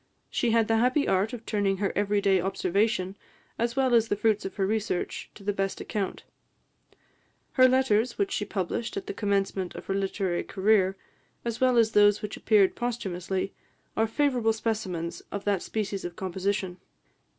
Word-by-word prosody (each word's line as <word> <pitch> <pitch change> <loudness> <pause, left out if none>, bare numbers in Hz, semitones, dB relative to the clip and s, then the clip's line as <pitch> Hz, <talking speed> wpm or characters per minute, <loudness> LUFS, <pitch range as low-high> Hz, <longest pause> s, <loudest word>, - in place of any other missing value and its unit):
She 240 - +1
had 225 -1 +3
the 225 - +3
happy 255 +5 +2
art 195 +4 +2
of 240 -3 -8
turning 200 -2 0
her 200 0 -1
every 205 0 +1
day 190 -2 +3
observation, 195 +1 0 0.4
as 235 +1 0
well 265 -2 +2
as 230 -1 +5
the 205 - 0
fruits 215 0 +1
of 195 - -5
her 195 - +1
research, 215 -2 -2
to 205 - -13
the 205 +1 0
best 195 -1 -2
account. 200 -3 -3 1.3
Her 255 -1 +6
letters, 250 -3 +2
which 200 - 0
she - - -1
published 205 - -3
at 395 - -4
the 405 - -4
commencement 195 - -1
of - - -8
her 195 - -1
literary 195 -2 -1
career, 195 -1 +2 0.5
as 235 0 -3
well 255 -1 +4
as 225 -1 +4
those 205 0 +4
which 210 - -4
appeared 205 -4 +3
posthumously, 195 -6 -3 0.4
are 225 - +2
favourable 245 -3 +1
specimens 200 -7 -3
of 200 - -4
that 200 -3 +1
species 205 -3 -3
of 175 -1 -5
composition. 190 0 -2
205 Hz, 175 wpm, -27 LUFS, 195-225 Hz, 1.3 s, Her